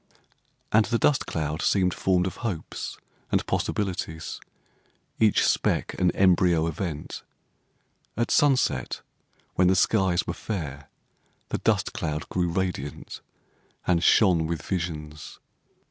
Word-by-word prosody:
And 110 0 +5
the 115 - +1
dust 145 +3 +2
cloud 80 -1 -2
seemed 90 -2 +2
formed 90 -1 +1
of 95 - -4
hopes 95 -9 -5 0.3
and - - +1
possibilities—each 95 +3 -2
speck - - +1
an 90 -1 +4
embryo 90 -3 +4
event. 80 -1 -4 1.0
At 120 - 0
sunset, 130 - +2 0.5
when 90 - +3
the 95 - +4
skies 95 -2 +2
were - - -3
fair, 75 -9 -5 0.6
the - - -2
dust - - +1
cloud 75 0 -3
grew 90 -1 0
radiant 85 -6 -4 0.6
and 85 -1 +2
shone 90 -7 +4
with 85 0 -3
visions. 75 -5 -5
90 Hz, 115 wpm, -26 LUFS, 80-95 Hz, 1.0 s, And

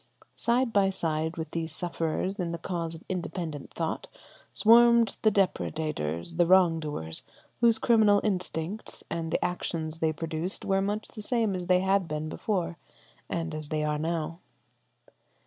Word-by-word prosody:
Side 235 0 +1
by 195 -1 +4
side 160 -3 -2
with 160 -1 -5
these 165 -1 -3
sufferers 175 +4 -2
in 175 -2 -1
the 170 - -3
cause 165 -1 -3
of 160 - -12
independent 170 -5 -4
thought 165 -1 -3 0.4
swarmed 235 0 +6
the 215 - +5
depredators, 155 - -1
the 175 -1 +4
wrong 180 -3 +5
doers, 80 - -2 0.4
whose 230 -1 +5
criminal 220 -3 +5
instincts 185 0 -3
and 165 -1 -2
the - - 0
actions 165 -2 -3
they 160 -1 +2
produced 160 +3 -4
were 195 0 +2
much 205 +2 -2
the 215 - -9
same 225 -2 +1
as 180 -1 -4
they 180 0 +4
had 190 -1 +2
been 155 0 -3
before 175 -2 -2 0.5
and 165 -1 -2
as 155 -1 -5
they 155 -1 0
are 150 0 0
now. 165 +1 -2
170 Hz, 155 wpm, -28 LUFS, 160-195 Hz, 0.5 s, swarmed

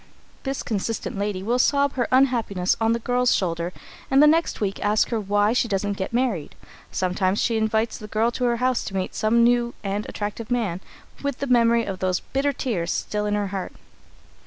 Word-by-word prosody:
This 270 0 -3
consistent 220 +1 -3
lady 200 -1 -2
will 240 +4 +1
sob 280 +2 +3
out - - -20
her 245 -3 0
unhappiness 235 -8 +2
on 225 0 +3
the - - +1
girl's 245 +1 +2
shoulder, 170 -1 -1 0.4
and 270 - +2
the 300 - +8
next 325 +2 +3
week 195 -2 -2
ask 210 +1 +2
her 230 - 0
why 205 +1 +2
she 245 - +1
doesn't 205 -1 -1
get 190 -1 -4
married. 235 - -1 0.4
Sometimes 185 +1 0
she 230 - +1
invites 220 +1 0
the 215 - -8
girl 220 +3 +1
to 250 +1 -2
her 240 -1 +2
house 255 0 +1
to 195 - -6
meet 185 -1 -2
some 235 +2 +3
new 240 0 +2
and 200 +1 -3
attractive 210 +2 -5
man 215 -8 -1 0.4
with 280 -2 -2
the 280 - -3
memory 235 -2 +3
of 190 -2 -5
those 185 -1 0
bitter 275 +2 -1
tears 215 -11 -2
still 210 0 -2
in 205 - 0
her 205 -1 -1
heart. 190 -1 -4
220 Hz, 205 wpm, -24 LUFS, 200-245 Hz, 0.4 s, the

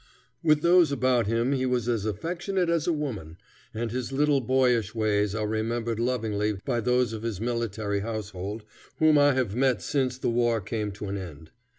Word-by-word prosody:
With 155 -3 +3
those 170 -3 +5
about 130 -5 +2
him 115 +4 +1
he 130 -2 0
was 125 -2 0
as 115 -4 0
affectionate 175 - -2
as 170 -1 0
a - - +3
woman, 110 - -4 0.3
and 115 0 -3
his 125 +1 -3
little 145 0 +2
boyish 125 -4 +1
ways 105 -2 +1
are 110 -1 -1
remembered 115 +1 -2
lovingly 110 -4 0
by 120 - 0
those 125 0 +1
of 110 - -5
his 115 -4 -3
military 110 -3 -2
household 105 -1 -5 0.3
whom 155 -2 +5
I 145 0 +5
have 125 -6 -1
met 130 -2 +2
since 130 -3 0
the 130 - -1
war 120 -1 +2
came 105 +1 -3
to 105 +1 -7
an 100 0 -3
end. 80 -4 -9
115 Hz, 185 wpm, -27 LUFS, 105-130 Hz, 0.3 s, those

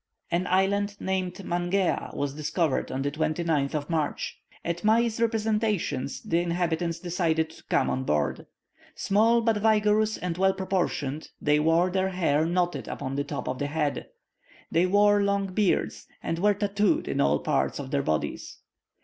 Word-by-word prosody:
An 175 +2 0
island 200 +2 +1
named 185 -1 -2
Mangea 175 +2 0
was 140 -1 -2
discovered 155 0 -1
on 135 - -2
the 140 - -1
29th 155 -1 0
of 145 -1 -2
March. 160 -3 -2 0.3
At 170 0 -3
Mai's 225 +1 +2
representations 215 - 0
the 170 - +1
inhabitants 170 -1 -1
decided 165 -3 0
to - - -16
come - - +1
on 130 - -1
board. 75 - -1 0.5
Small, 225 +4 +3
but 225 -2 +2
vigorous 215 0 +2
and 180 -1 -4
well 190 0 +3
proportioned, 175 -6 -2
they 150 0 +2
wore 165 +4 +3
their 190 0 +1
hair 160 -4 +1
knotted 175 0 -1
upon 135 -1 -4
the 140 - 0
top 145 - -5
of 130 - -3
the 145 - -1
head. 150 -1 -2 0.6
They 170 +3 +3
wore 205 +1 +4
long 200 -1 0
beards, 205 -1 0 0.2
and 165 0 -2
were 205 +2 +3
tatooed 205 0 +1
in - - 0
all 70 +1 +3
parts 65 -2 0
of 135 -2 -6
their 140 - +1
bodies. 80 - -3
175 Hz, 160 wpm, -27 LUFS, 150-200 Hz, 0.6 s, wore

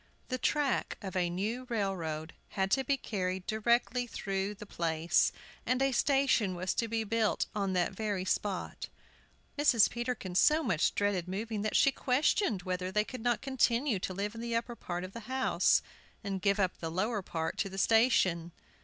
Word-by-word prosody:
The 255 -1 -2
track 290 -1 0
of 190 -1 -6
a 180 -1 +1
new 215 +8 -3
railroad 170 -8 -2
had 190 -1 -2
to 270 - +3
be 275 +2 +1
carried 185 -6 -3
directly 235 +3 +1
through 195 -2 -3
the 210 +1 -10
place, 165 -3 +1 0.3
and 255 0 +1
a 270 0 +2
station 260 -7 +2
was 185 +1 -1
to 230 - -1
be 225 0 -1
built 220 0 +1
on 195 -2 -1
that 180 -2 +1
very 200 -2 -2
spot. 195 0 -2 0.7
Mrs. 245 -7 +5
Peterkin 240 -6 -3
so 305 - +4
much 185 - +1
dreaded 200 -4 0
moving 210 +3 -3
that 215 - -2
she 275 - +5
questioned 255 - +1
whether 185 0 -2
they 210 +2 +2
could 255 0 -7
not 240 +1 0
continue 255 -3 +1
to 185 - -3
live 205 +2 -2
in 230 - -7
the 235 0 -2
upper 235 +1 -2
part 175 -5 -5
of 185 +1 -7
the 235 - -6
house 260 0 +3 0.4
and 195 -2 -3
give 200 +1 +2
up 185 -2 0
the 165 - -3
lower 205 +6 -1
part 160 -3 -3
to 195 - 0
the 195 - -8
station. 190 -7 +3
210 Hz, 180 wpm, -31 LUFS, 185-240 Hz, 0.7 s, Mrs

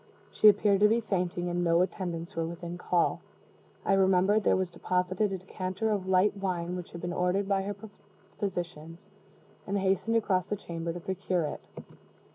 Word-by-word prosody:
She 215 - +7
appeared 205 -1 +3
to 210 - +6
be 225 +2 +3
fainting, 180 -5 -2
and 175 0 -1
no 170 +1 +4
attendants 175 -3 -4
were 165 0 -1
within 170 0 -6
call. 175 -1 0 0.6
I - - +3
remembered 195 +2 +4
where - - +4
was 185 -2 -1
deposited 180 +3 0
a 190 - -2
decanter 185 +3 -3
of 195 -3 -1
light 190 +2 +3
wine 180 -3 -2
which 180 -1 -7
had 170 - -7
been 175 0 -3
ordered 180 +3 0
by 195 -1 +2
her 200 +1 -4 0.6
physicians, 175 -2 -5 0.6
and 200 - 0
hastened 195 +3 +1
across 190 -5 +1
the 210 - -1
chamber 170 -3 -5
to 175 - -6
procure 185 -1 -1
it. 150 - -4
185 Hz, 175 wpm, -29 LUFS, 175-195 Hz, 0.6 s, She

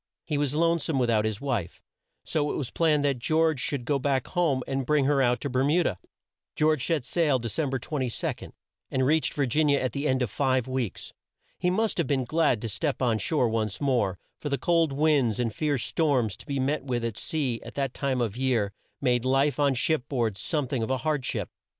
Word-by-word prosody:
He 150 -3 -1
was 145 -1 0
lone 165 +1 +3
some 155 -2 -2
with 120 -2 +2
out 110 -1 +2
his 110 -2 -2
wife, 120 -11 -3 0.4
so 150 -1 -1
it - - -3
was 135 -5 -3
planned 155 -3 +2
that 140 -3 +1
George 160 +2 +2
should 125 -1 -2
go 140 +1 +1
back 135 -1 0
home 160 -8 +1
and 135 0 -2
bring 145 +1 +2
her 140 0 +3
out 125 -1 +2
to - - -2
Ber 130 -1 +1
mu 160 +6 +3
da. - - +1 0.6
George 155 -3 +2
set 155 -7 0
sail, 155 -5 +2
De 120 -1 -4
cem 140 +7 -1
ber 135 - -1
22, 130 -1 -3 0.4
and 130 -1 +1
reached 155 +3 +2
Vir 145 - +1
gin 150 +5 +2
i - - +5
a 140 - +3
at 130 - -1
the 140 +1 -2
end 130 -1 +2
of 115 - -3
five 130 -3 +1
weeks. 130 -6 -3 0.5
He 180 - +1
must 215 +1 0
have 165 - +1
been 130 -2 0
glad 150 -6 +1
to - - -1
step 100 -1 -2
on 120 -4 +1
shore 130 +3 +1
once 110 -2 -1
more, 120 -10 +1 0.2
for 145 - -4
the 140 - 0
cold 165 +2 +2
winds 140 -5 +2
and 115 -3 0
fierce 145 -5 0
storms 130 - +1
to - - -15
be 140 -1 -2
met 140 +2 0
with 120 -3 -2
at 115 -2 -3
sea, 135 -6 -2
at 115 - -10
that 135 -2 -1
time 135 -3 -1
of 115 -4 -1
the 125 - -7
year, 115 -7 +1 0.3
made 125 -3 +2
life 135 +3 +2
on 140 -2 +3
ship 150 +2 0
board 115 -7 0
some 140 - -2
thing 130 -2 -2
of 110 - -2
a 130 - +1
hard 150 -4 +1
ship. - - -3
135 Hz, 235 wpm, -27 LUFS, 120-150 Hz, 0.6 s, i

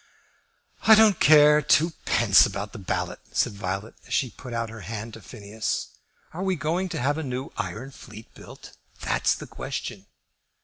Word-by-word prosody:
"I 220 - +10
don't 215 -4 +5
care 150 0 +6
twopence 145 - +3
about 100 +1 -6
the 110 - -8
ballot," 95 - -3
said - - +1
Violet, 100 +2 -5
as 120 - -2
she 130 -4 0
put 125 - -11
out 115 -1 -3
her 115 - -9
hand 110 +4 -6
to - - -10
Phineas. 110 -1 -4 0.4
"Are 170 - -6
we 190 -1 0
going 170 +5 -2
to 165 - -4
have 145 +5 0
a - - -3
new 130 0 -5
iron 130 +6 -5
fleet 110 -4 -13
built? - - -13 0.3
That's - - +1
the - - -9
question." - - -6
125 Hz, 170 wpm, -25 LUFS, 110-155 Hz, 0.4 s, I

